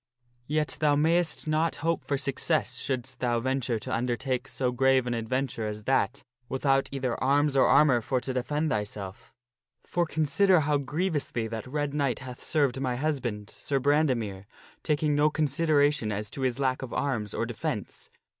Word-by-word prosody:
Yet 150 0 -1
thou 150 -2 +3
mayst 160 +1 +1
not 155 +2 +1
hope 165 -1 +1
for 140 - -1
success 135 0 0
shouldst 130 -1 -3
thou 120 -2 +1
venture 130 -1 -1
to 130 +4 -5
undertake 125 +2 -1
so 125 -2 -1
grave 130 0 +3
an 120 - -1
adventure 115 0 -2
as 105 0 -5
that 105 +1 +1 0.3
without 135 0 +1
either 130 -3 -2
arms 140 +1 +3
or 135 - +5
armor 135 -6 +5
for 130 +3 0
to 130 - -4
defend 150 +5 -1
thyself. 105 -2 -4 0.5
For 175 -1 -1
consider 160 +4 +3
how 145 -1 +1
grievously 145 -5 -1
that 110 +1 -5
Red 145 +1 -2
Knight 140 -5 0
hath 125 -1 -9
served 140 -5 +1
my 125 -2 0
husband, 120 -7 -2
Sir 140 -1 -2
Brandemere, 125 -9 +1 0.4
taking 150 -1 +1
no 145 +1 +4
consideration 145 -5 +2
as 105 0 -4
to 135 - -6
his 130 -2 0
lack 130 -2 0
of 130 - -6
arms 115 -8 -2
or - - 0
defence. 115 -2 -5
135 Hz, 165 wpm, -28 LUFS, 120-150 Hz, 0.5 s, or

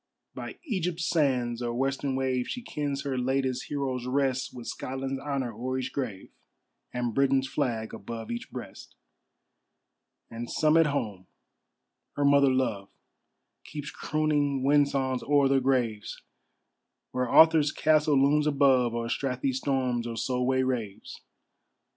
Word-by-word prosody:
By - - -7
Egypt's 180 - -2
sands 125 -7 +1
or 120 -1 -2
western 135 +1 -1
wave, 130 -1 0
She 245 - -5
kens 145 -7 -3
her 135 -2 -2
latest 130 0 0
heroes 130 -3 -3
rest, 130 0 0
With 120 -2 -9
Scotland's 135 +1 -4
honor 135 -5 -2
o'er 130 +4 -3
each 130 -1 -4
grave, 115 -9 -4 0.6
And 120 -2 -2
Britain's 135 +1 +2
flag 120 -6 -2
above 115 +1 -7
each 120 - -5
breast. - - -9 1.4
And 115 +1 -6
some 155 0 +2
at 165 -1 +5
home. 105 -10 -3 0.9
Her 145 - +1
mother 140 -1 +5
love 120 -7 -1 0.7
Keeps 150 -1 -7
crooning 145 -3 0
wind 145 +1 +4
songs 130 -2 -1
o'er 145 -1 +3
their 135 0 +3
graves, 125 -5 -1 0.9
Where 125 -1 -1
Arthur's 160 -3 +6
castle 155 -3 +3
looms 150 +2 +3
above, 135 -5 +3
Or 115 0 -2
Strathy 130 +2 -1
storms 130 -3 -1
or 115 -1 -5
Solway 130 +2 +1
raves. 120 -6 -4
130 Hz, 135 wpm, -28 LUFS, 125-140 Hz, 1.4 s, Arthur's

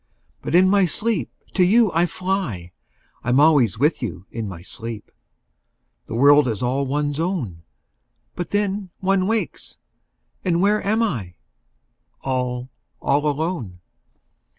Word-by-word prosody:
5 - - -41
But - - -2
in 185 +1 +6
my 200 0 +4
sleep 205 - 0 0.2
to 185 - +4
you 215 +3 +4
I 170 +2 +3
fly: 180 - -3 0.5
I'm 120 +3 +2
always 140 - +4
with 150 +7 +2
you 90 -7 -5
in 115 -2 -4
my 90 -3 -8
sleep! 110 +2 -7 1.0
The - - -5
world 145 +3 +6
is 110 -1 -2
all 135 +3 0
one's 145 +1 -1
own. 155 - -2 0.7
But 175 -2 -4
then 205 -1 -1
one 190 0 +1
wakes, 225 0 -3 0.7
and 170 -3 +1
where 205 +3 +2
am 220 +3 +2
I? 105 - -3 0.9
All, 125 -1 -2 0.3
all 145 +2 +1
alone. 145 - -3
150 Hz, 135 wpm, -22 LUFS, 120-190 Hz, 1.0 s, in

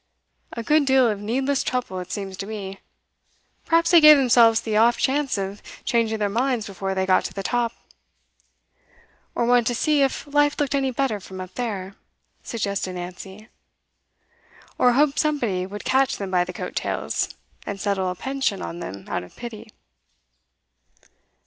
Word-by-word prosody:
A 230 - -5
good 300 +2 +3
deal 265 -2 +5
of 210 -3 -1
needless 265 +6 0
trouble, 250 -7 -2
it 180 - -8
seems 195 -2 -5
to 195 - -5
me. 195 -3 -6 0.9
Perhaps 335 +1 +3
they 340 -2 +8
gave 305 -1 +10
themselves 235 -4 +5
the 220 -2 -3
off 230 +2 +4
chance 275 -2 0
of 195 +1 -4 0.2
changing 225 -2 +1
their 210 -1 0
minds 235 +1 0
before 195 0 -4
they 190 0 0
got 185 -1 +3
to - - -5
the 195 - -4
top.' 240 0 -1 1.6
'Or 235 - +1
wanted 240 -1 +3
to 245 - 0
see 300 +4 +2
if 270 0 0
life 290 0 +2
looked 290 -2 0
any 270 -1 +1
better 255 -4 -1
from 185 0 -10
up 185 0 -8
there,' 200 -6 -4 0.5
suggested 200 -4 -3
Nancy. 185 +4 -8 1.3
'Or 245 - +5
hoped 285 +2 +2
somebody 235 - 0
would 205 +2 -8
catch 270 +1 +2
them 195 -2 -5
by 180 -1 +2
the 180 - -6
coat - - -6
tails, - - -2 0.3
and 200 -1 -4
settle 195 -2 0
a 180 - -4
pension 265 -3 -2
on 170 - -6
them 100 - -7
out - - -2
of 90 - -14
pity. 230 -2 -9
225 Hz, 170 wpm, -23 LUFS, 195-265 Hz, 1.6 s, gave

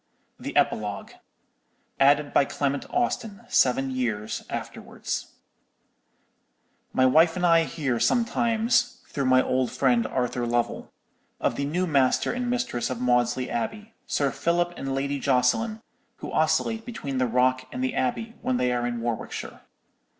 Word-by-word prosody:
_ - - -14
THE - - -3
EPILOGUE: 105 -2 0 0.9
ADDED 145 +1 +4
BY 140 - +4
CLEMENT 140 0 -2
AUSTIN 225 -4 -1
SEVEN 135 +1 +2
YEARS 115 -5 -2
AFTERWARDS. - - -5 1.6
"My 130 - +3
wife 160 +6 +5
and 180 -1 0
I 165 -1 +5
hear 135 -5 -2
sometimes, 240 - +1
through 140 -2 -2
my 130 0 +5
old 130 -1 0
friend 120 -4 +2
Arthur 125 -1 -1
Lovell, 120 0 -1 0.5
of - - 0
the 140 - -2
new 175 +6 0
master 140 -6 +2
and 250 0 -2
mistress 240 - -1
of 130 - -3
Maudesley 125 0 +1
Abbey, 210 - -4
Sir 140 -2 +1
Philip 175 +1 0
and 135 0 -3
Lady 140 +1 -1
Jocelyn, 140 - +1 0.3
who - - -8
oscillate 160 +8 +1
between 145 - -4
the 130 - +2
Rock 130 +2 +1
and 125 - -4
the 130 - 0
Abbey 175 - -2
when 130 - 0
they 125 0 +1
are 120 0 0
in 120 -1 -3
Warwickshire. 115 -1 -4
135 Hz, 145 wpm, -26 LUFS, 125-175 Hz, 1.6 s, wife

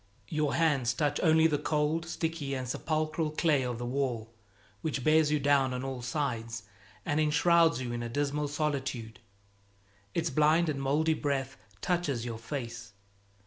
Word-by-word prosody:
Your 150 -2 0
hands 140 -7 +2
touch 145 0 0
only 160 -1 +5
the 150 -3 +3
cold, 155 +2 0
sticky 160 -4 -2
and 130 -1 -4
sepulchral 155 +3 -1
clay 155 -2 +2
of 125 -2 -2
the 120 - -4
wall, 120 -3 -2 0.5
which 140 -5 -2
bears 155 +1 +4
you 150 0 +2
down 135 -2 +3
on 125 - -4
all 135 -2 -4
sides 115 -4 -3 0.4
and 145 - 0
enshrouds 165 +1 +4
you 120 - -4
in 120 - -3
a 120 - -4
dismal 145 +3 -1
solitude; 135 -6 -3 1.0
its 165 -2 0
blind 155 +4 +3
and 140 -2 -2
moldy 150 +4 +2
breath 140 -3 -2 0.3
touches 150 -10 -1
your 115 -2 -5
face. 120 -3 -6
145 Hz, 155 wpm, -30 LUFS, 125-155 Hz, 1.0 s, only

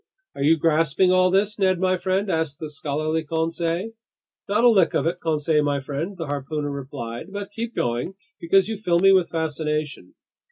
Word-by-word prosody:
"Are - - -8
you 155 +3 +4
grasping 165 +3 +2
all 185 0 +4
this, 200 +3 +1
Ned 185 -2 +2
my 185 0 +2
friend?" 190 +2 -1
asked 160 -4 -1
the 155 -2 -7
scholarly 155 +2 -2
Conseil. 165 +5 -2 0.6
"Not 210 +3 +2
a - - +7
lick 195 -7 +3
of - - +1
it, 175 +2 -1
Conseil 155 -1 +1
my 145 -1 0
friend," 150 +8 -5
the 165 - -4
harpooner 145 +1 -3
replied. 135 +1 -7
"But 205 0 -6
keep 230 +2 -5
going, 120 +10 -2 0.2
because 190 +3 +3
you 220 -1 -3
fill 180 -5 +1
me 195 +2 +5
with 185 -3 +3
fascination." 150 - -3
165 Hz, 185 wpm, -23 LUFS, 150-185 Hz, 0.6 s, a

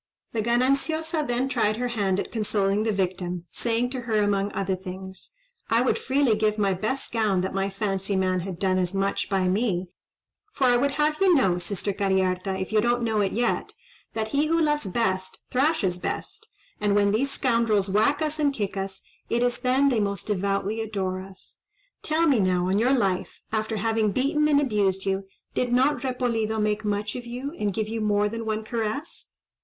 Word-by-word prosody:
The 225 - -1
Gananciosa 285 +7 +1
then 245 +2 0
tried 215 -5 +1
her 245 +1 -1
hand 200 -5 0
at - - -4
consoling 205 -2 +1
the 220 0 +1
victim; 180 -3 -2
saying 240 +1 0
to 260 - -3
her, 230 -2 -2
among 205 -1 +1
other 190 -1 -1
things—"I 190 - -4
would 255 - +1
freely 265 -4 +2
give 215 0 +1
my 200 -2 +2
best 220 +10 -3
gown 215 -5 +2
that 190 - -3
my 195 0 0
fancy 195 0 -2
man 185 -1 +1
had 180 0 -5
done 185 0 +1
as 180 +1 -1
much 195 0 0
by 190 -2 +1
me; 185 -2 0 0.6
for 275 - -2
I 245 -1 +5
would 275 +3 +2
have 300 +1 +1
you 375 -3 +6
know, 190 - +3
sister 200 +2 -2
Cariharta, 190 -1 0
if 190 - -4
you 215 - +4
don't 240 +1 +1
know 220 -2 +1
it 195 - +1
yet, 240 +2 -1 0.4
that 220 -1 -2
he 285 +5 +1
who 330 +1 +2
loves 295 -7 +1
best 190 -2 -1
thrashes 255 - +1
best; - - -5 0.3
and 205 -1 +1
when 200 -1 +4
these 250 +7 +1
scoundrels 230 -7 +1
whack 220 +10 +2
us 310 0 -2
and 290 -2 +3
kick 205 -4 -2
us, 195 0 -4 0.3
it 240 +1 +1
is 245 0 0
then 260 +3 +3
they 245 -4 +1
most 200 -1 -2
devoutly 200 +2 -1
adore 190 -4 -2
us. 190 0 -12 0.4
Tell 315 +2 +1
me 275 -7 +4
now, 180 -2 +2
on 200 +4 +2
our 250 - +3
life, 195 -9 0
after 220 0 -1
having 220 0 +1
beaten 300 - +2
and 290 -1 +4
abused 200 -8 +1
you, 195 0 -1 0.3
did 250 -1 0
not 265 +4 +3
Repolido 235 -4 -1
make 210 0 0
much 210 0 -2
of 245 -1 -6
you, 250 +4 -5
and 210 -1 0
give 215 +2 -2
you 225 +1 -3
more 210 -1 +2
than 225 +1 -5
one 215 0 -1
caress?" 230 +7 -4
215 Hz, 195 wpm, -25 LUFS, 195-250 Hz, 0.6 s, you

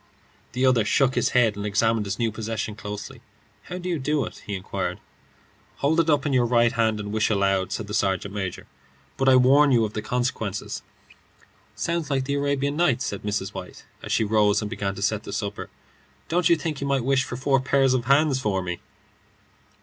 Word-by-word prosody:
The 130 +1 +1
other 125 -4 +4
shook 130 +5 +2
his - - +1
head 115 -4 +4
and 100 - -5
examined 105 +1 +1
his 100 - -3
new 115 -2 0
possession 110 0 -4
closely. 105 -1 -7 0.4
"How 180 - -6
do 180 0 -6
you 170 -3 -1
do 145 0 0
it?" - - -10
he 100 - -2
inquired. 95 0 -4 0.8
"Hold 155 +4 +1
it 165 -1 +2
up 145 -2 +2
in 145 - 0
your 125 -2 +3
right 120 -1 +3
hand 110 -2 +1
and 105 0 -5
wish 110 0 +1
aloud," 100 -2 +1
said 110 - -3
the 105 - -8
sergeant 100 -2 0
major, 95 -4 -4 0.5
"but 135 0 +2
I 130 - +7
warn 135 +3 +5
you 115 -3 +4
of 105 - -6
the 105 - -3
consequences." 110 -4 -3 0.9
"Sounds 170 -2 -2
like 135 -2 0
the 140 - -2
Arabian 140 0 0
Nights," 140 -7 +2
said 100 - -4
Mrs. 105 -2 -3
White, - - -9 0.2
as - - -7
she - - +2
rose 105 -1 +3
and 105 -1 -4
began 100 -3 -3
to 100 - -5
set 105 0 0
the - - -9
supper. 100 -1 -4 0.6
"Don't 175 +1 +2
you 170 - +6
think 155 -3 -4
you 140 - -2
might 135 -3 0
wish 135 0 +3
for 125 - -6
four 135 +1 +2
pairs 135 0 +2
of 125 -2 0
hands 140 +1 +3
for 100 -6 -1
me?" 90 -1 -4
120 Hz, 210 wpm, -24 LUFS, 105-140 Hz, 0.9 s, I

